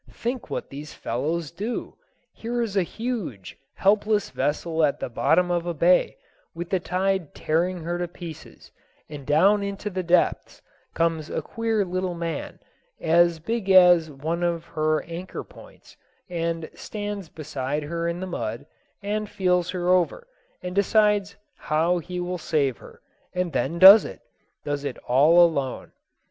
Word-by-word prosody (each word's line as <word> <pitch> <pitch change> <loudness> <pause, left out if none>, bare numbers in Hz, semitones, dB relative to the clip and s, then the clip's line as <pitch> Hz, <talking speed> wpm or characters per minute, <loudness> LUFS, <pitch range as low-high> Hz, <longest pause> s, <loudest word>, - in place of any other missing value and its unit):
Think 245 +1 -4
what - - -5
these 145 +2 -8
fellows 150 +6 -3
do! 210 +8 -5 0.4
Here 240 +1 -3
is 210 -3 -4
a 195 - +4
huge, 190 - -5 0.2
helpless 210 +1 +2
vessel 160 +4 -1
at 145 -2 +1
the - - -4
bottom 160 +9 +2
of 175 0 -1
a 170 - -2
bay, 175 +4 +3 0.4
with 170 +1 -6
the 190 - +2
tide 185 -2 -1
tearing 170 +2 -1
her 175 +1 -3
to 175 - -2
pieces, 165 -2 -11 0.4
and 145 -3 -9
down 195 +8 +4
into 200 +1 -4
the 185 0 -2
depths 175 0 +1 0.4
comes 165 -2 0
a - - -3
queer 225 -3 -1
little 185 0 -2
man, 170 -1 -4 0.4
as 170 +1 +3
big 205 +5 -3
as 180 -4 +7
one 155 +5 -4
of 170 -1 -1
her 155 0 0
anchor 170 +2 -7
points, - - -17 0.3
and 165 -2 -3
stands 205 -4 -6
beside 150 -1 -4
her 170 +3 -3
in 170 +1 -3
the - - -3
mud, 115 -10 -4 0.4
and 210 +1 -2
feels 180 -2 +1
her 180 -1 -2
over, 185 - +2 0.4
and 180 0 -4
decides 205 0 +2 0.2
how 165 +4 +1
he 180 +2 -6
will 180 0 -3
save 140 -6 0
her; - - -15 0.3
and 180 -3 -1
then 135 +6 -1
does 195 +4 +10
it - - -9 0.4
does 145 -1 -2
it 140 -3 -4
all 155 +8 +6
alone. 140 -6 -3
175 Hz, 155 wpm, -24 LUFS, 155-190 Hz, 0.4 s, does